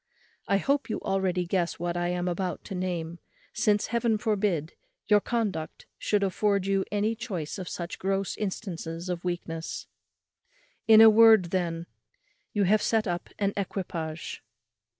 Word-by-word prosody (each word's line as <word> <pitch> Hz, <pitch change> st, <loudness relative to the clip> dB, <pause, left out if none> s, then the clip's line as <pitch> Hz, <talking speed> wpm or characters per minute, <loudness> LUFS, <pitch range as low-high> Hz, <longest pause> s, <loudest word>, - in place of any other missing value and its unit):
I 200 Hz, -, +3 dB
hope 275 Hz, +6 st, 0 dB
you -, -, -2 dB
already 185 Hz, -2 st, 0 dB
guess 175 Hz, -1 st, -1 dB
what 175 Hz, 0 st, -2 dB
I 175 Hz, 0 st, 0 dB
am 180 Hz, 0 st, -1 dB
about 180 Hz, -1 st, -2 dB
to 200 Hz, -, -7 dB
name; 175 Hz, -2 st, -3 dB, 0.3 s
since, 210 Hz, -1 st, +2 dB
Heaven 235 Hz, -2 st, +2 dB
forbid, 205 Hz, -8 st, 0 dB, 0.3 s
your 210 Hz, -1 st, +6 dB
conduct 205 Hz, -9 st, -3 dB
should 205 Hz, -1 st, +1 dB
afford 200 Hz, 0 st, +1 dB
you 195 Hz, 0 st, +1 dB
any 210 Hz, +2 st, +1 dB
choice 200 Hz, -8 st, -5 dB
of 180 Hz, -, -5 dB
such 170 Hz, 0 st, -5 dB
gross 195 Hz, 0 st, -1 dB
instances 180 Hz, -4 st, -4 dB
of 175 Hz, -1 st, -3 dB
weakness. 170 Hz, -2 st, -4 dB, 1.0 s
In 220 Hz, -1 st, +9 dB
a 225 Hz, -, +10 dB
word, 220 Hz, -5 st, +6 dB
then, 170 Hz, -3 st, -1 dB, 0.7 s
you 205 Hz, -, +1 dB
have 210 Hz, +3 st, +3 dB
set 225 Hz, -1 st, +1 dB
up 175 Hz, -1 st, -3 dB
an 200 Hz, -1 st, 0 dB
equipage. 170 Hz, -5 st, -4 dB
190 Hz, 150 wpm, -27 LUFS, 175-210 Hz, 1.0 s, a